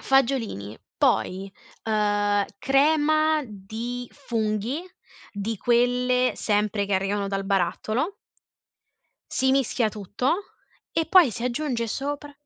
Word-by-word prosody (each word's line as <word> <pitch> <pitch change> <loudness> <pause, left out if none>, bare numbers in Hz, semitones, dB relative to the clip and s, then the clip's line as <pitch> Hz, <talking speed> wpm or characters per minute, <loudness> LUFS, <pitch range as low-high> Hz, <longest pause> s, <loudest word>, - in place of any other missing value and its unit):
fagiolini, 235 - +1 0.2
poi, 195 +2 +1 0.3
uhm, 205 -2 +2
crema 310 +3 +3
di 225 +4 -6
funghi, 230 - -2 0.5
di 210 +1 -3
quelle 250 +2 +2
sempre 210 -1 0
che 200 - -3
arrivano 195 +1 0
dal 195 0 -2
barattolo. 200 - 0 1.2
Si 265 - +2
mischia 260 -3 +2
tutto 210 - -1 0.6
e 325 - 0
poi 330 -8 +6
si 230 - -6
aggiunge 245 -2 -1
sopra 290 +4 -4
235 Hz, 100 wpm, -25 LUFS, 205-270 Hz, 1.2 s, poi